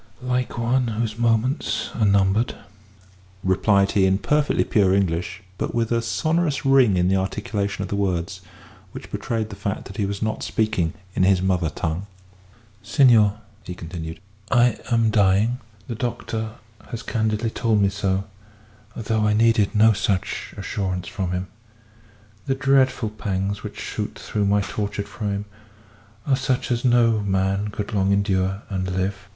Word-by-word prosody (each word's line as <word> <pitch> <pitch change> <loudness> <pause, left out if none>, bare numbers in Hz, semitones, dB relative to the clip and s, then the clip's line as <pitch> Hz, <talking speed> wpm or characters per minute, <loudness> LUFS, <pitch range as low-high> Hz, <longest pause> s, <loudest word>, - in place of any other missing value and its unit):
"Like 125 -1 -1
one 120 +2 +1
whose 110 0 -2
moments 120 +4 0
are 110 -3 +1
numbered," 100 +3 +2 0.9
replied 100 +1 +3
he 95 -3 +3
in 95 0 +3
perfectly 145 +8 +1
pure 95 -3 +3
English, 90 0 -1 0.2
but - - -2
with 115 -1 0
a 115 0 +2
sonorous 155 +4 0
ring 130 -8 +5
in 90 0 +2
the 95 +1 +3
articulation 100 +1 -2
of 95 - -6
the - - -1
words, 95 -1 -1 0.5
which - - -9
betrayed 110 -2 -2
the - - -6
fact 100 0 -4
that 95 - -10
he 100 - 0
was 100 +1 -3
not 110 0 -2
speaking 110 -7 0 0.2
in - - -1
his 95 0 +4
mother 90 -4 +1
tongue. 85 +5 -3 0.7
"Senor," 110 -3 +4 0.2
he 90 -3 -7
continued, 80 -1 -7 0.3
"I 120 -2 +3
am 115 -2 +3
dying; 105 +4 +3 0.3
the - - -3
doctor 110 -2 -3 0.4
has 115 0 -5
candidly 110 0 -1
told 110 -3 +1
me 100 -1 +4
so, 95 -1 -1 0.7
though 110 -1 0
I 105 - +3
needed 115 -1 +3
no 110 +1 +6
such 95 -1 -2
assurance 95 -3 -3
from 95 -3 -3
him. 90 +1 -2 1.0
The 135 - +1
dreadful 130 -4 +2
pangs 100 -1 -2
which - - -8
shoot - - -4
through 105 -1 -2
my 100 +1 +3
tortured 100 0 -3
frame 105 -1 -3 0.8
are 135 - +3
such 130 -1 -1
as 120 0 0
no 120 -3 +4
man 100 0 0
could 105 +1 -5
long 100 -1 +2
endure 95 0 +1
and 95 -2 -3
live. 95 +1 -2
105 Hz, 155 wpm, -23 LUFS, 95-115 Hz, 1.0 s, no